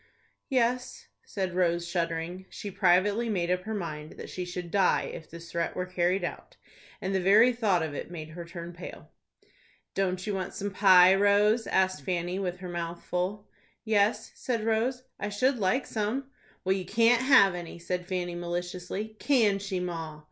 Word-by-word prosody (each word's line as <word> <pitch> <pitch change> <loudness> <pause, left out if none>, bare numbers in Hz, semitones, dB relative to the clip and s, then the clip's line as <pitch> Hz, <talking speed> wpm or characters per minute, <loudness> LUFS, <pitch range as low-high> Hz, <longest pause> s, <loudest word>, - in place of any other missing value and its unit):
"Yes," 250 -1 0 0.2
said 190 -3 -3
Rose, 170 -1 +1
shuddering. 170 +1 -3
She 205 - -7
privately 200 +6 +3
made 180 -4 0
up 180 +1 -1
her 220 - -3
mind 155 -5 -5
that - - -9
she 180 - -4
should 175 -1 -6
die 195 0 +3
if 160 - -9
this 170 0 -10
threat 170 0 -2
were 180 - -2
carried 180 +1 0
out, - - -6 0.4
and 190 +1 -3
the 190 - +1
very 215 +7 +6
thought 205 -8 +1
of 155 -2 -4
it 145 - -5
made 160 -3 -7
her 170 +2 -7
turn 170 0 -8
pale. 175 +1 -10 0.8
"Don't 185 -1 -1
you 210 - -2
want 190 -1 -4
some 200 0 -3
pie, 185 -2 +7
Rose?" 205 +3 +3
asked 185 -5 +1
Fanny, 175 +3 -2
with 180 -2 -2
her 180 - -6
mouth 170 0 -5
full. 190 +4 -2 0.4
"Yes," 210 -1 +2
said 235 -4 -2
Rose, 235 +3 0 0.2
"I 205 - -2
should 250 +5 +1
like 205 +7 +1
some." 235 +6 -2 0.3
"Well, 190 - +2
you 190 -1 -3
can't 230 +5 +4
have 260 -8 +6
any," 175 -2 -7
said 180 +1 -4
Fanny, 180 -2 -2
maliciously. 180 +4 -4
"Can 225 -8 +3
she, 195 -2 -3
ma?" 165 -4 -5
185 Hz, 175 wpm, -28 LUFS, 175-210 Hz, 0.8 s, pie